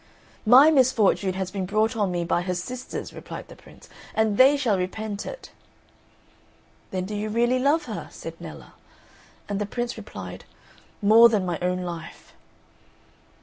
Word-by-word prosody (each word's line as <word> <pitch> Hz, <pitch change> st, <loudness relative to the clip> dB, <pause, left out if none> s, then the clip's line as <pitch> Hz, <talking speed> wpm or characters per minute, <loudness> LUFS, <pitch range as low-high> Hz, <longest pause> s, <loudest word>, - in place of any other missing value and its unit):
"My 265 Hz, +7 st, +8 dB
misfortune 235 Hz, -8 st, +3 dB
has 190 Hz, 0 st, -4 dB
been 190 Hz, -2 st, -3 dB
brought 215 Hz, +4 st, +1 dB
on 205 Hz, -4 st, 0 dB
me 175 Hz, -1 st, -1 dB
by 175 Hz, -, +1 dB
her 180 Hz, 0 st, -2 dB
sisters," 250 Hz, +8 st, -6 dB
replied -, -, -9 dB
the -, -, -11 dB
Prince, -, -, -17 dB, 0.3 s
"and 220 Hz, -1 st, +2 dB
they 270 Hz, +5 st, +6 dB
shall 230 Hz, -9 st, +1 dB
repent 205 Hz, +2 st, -4 dB
it." -, -, -9 dB, 1.4 s
"Then 185 Hz, -1 st, -3 dB
do 210 Hz, -, -6 dB
you 210 Hz, +1 st, -3 dB
really 240 Hz, +3 st, +2 dB
love 285 Hz, +5 st, +2 dB
her?" -, -, -6 dB
said -, -, -8 dB
Nella. -, -, -10 dB, 0.7 s
And 200 Hz, -1 st, -2 dB
the 205 Hz, -, -2 dB
Prince 240 Hz, +2 st, -4 dB
replied, -, -, -9 dB, 0.6 s
"More 225 Hz, +3 st, +8 dB
than 210 Hz, -4 st, 0 dB
my 175 Hz, -2 st, -2 dB
own 180 Hz, 0 st, -1 dB
life." 170 Hz, -2 st, -8 dB
210 Hz, 155 wpm, -25 LUFS, 185-245 Hz, 1.4 s, My